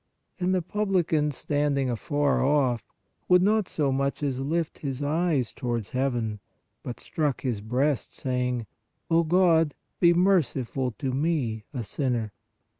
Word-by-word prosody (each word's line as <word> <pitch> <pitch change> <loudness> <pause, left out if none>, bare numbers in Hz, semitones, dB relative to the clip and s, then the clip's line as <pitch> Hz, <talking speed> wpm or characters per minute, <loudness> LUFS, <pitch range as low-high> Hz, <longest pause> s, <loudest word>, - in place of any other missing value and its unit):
And 185 +1 +1
the 180 - 0
publican, 180 -6 +1
standing 145 -1 0
afar 140 +4 +1
off, 130 -4 +1 0.4
would 180 0 +6
not 210 -1 +2
so 145 -3 0
much 140 +2 -1
as 135 -3 -1
lift 160 +4 -1
up - - -24
his 135 -1 -3
eyes 150 -4 +1
towards 120 -4 -3
heaven, 120 -5 -1 0.4
but 120 - -6
struck 150 -4 -1
his 120 -6 -2
breast, 130 +5 0
saying: 125 -2 -1 0.5
O 165 +1 +5
God, 165 -3 +3 0.2
be 170 -1 +5
merciful 145 -9 +2
to 130 +5 -3
me, 130 -7 -1
a 125 -6 -4
sinner. 120 -3 -2
140 Hz, 140 wpm, -26 LUFS, 125-165 Hz, 0.5 s, would